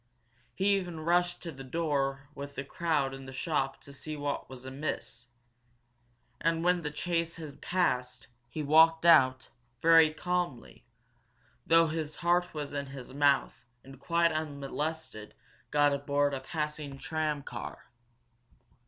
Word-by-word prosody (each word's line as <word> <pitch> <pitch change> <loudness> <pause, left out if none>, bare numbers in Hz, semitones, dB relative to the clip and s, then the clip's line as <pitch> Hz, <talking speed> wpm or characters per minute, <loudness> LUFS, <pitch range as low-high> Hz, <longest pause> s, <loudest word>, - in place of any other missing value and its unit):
He 200 +1 +3
even 175 -4 -5
rushed 175 +2 +1
to 170 - -5
the 135 -2 -9
door 135 -2 -1
with 140 0 -8
the 140 - -3
crowd 145 -3 0
in 135 0 -9
the - - -7
shop 135 0 -1
to 140 - -12
see 150 +3 -6
what 145 -1 -3
was 130 -1 -10
amiss! 130 -3 -5 1.1
And, 165 0 +1
when 180 0 +3
the 150 - -2
chase 165 +2 -2
had 155 -4 -9
passed, 130 -9 0 0.2
he 155 - -4
walked 160 +3 +5
out, 130 -6 +5 0.3
very 165 +1 +6
calmly, 175 -6 -3 0.8
though 165 0 +6
his 155 -1 -3
heart 175 +1 +1
was 145 -2 -5
in 140 -1 -3
his 135 -1 -9
mouth, 140 -1 +2 0.2
and 135 0 -13
quite 170 +2 +2
unmolested 150 -5 -4 0.3
got 145 -1 +4
aboard 145 0 +1
a 135 - -2
passing 150 0 -4
tram 155 -1 -2
car. - - -8
150 Hz, 140 wpm, -30 LUFS, 135-165 Hz, 1.1 s, very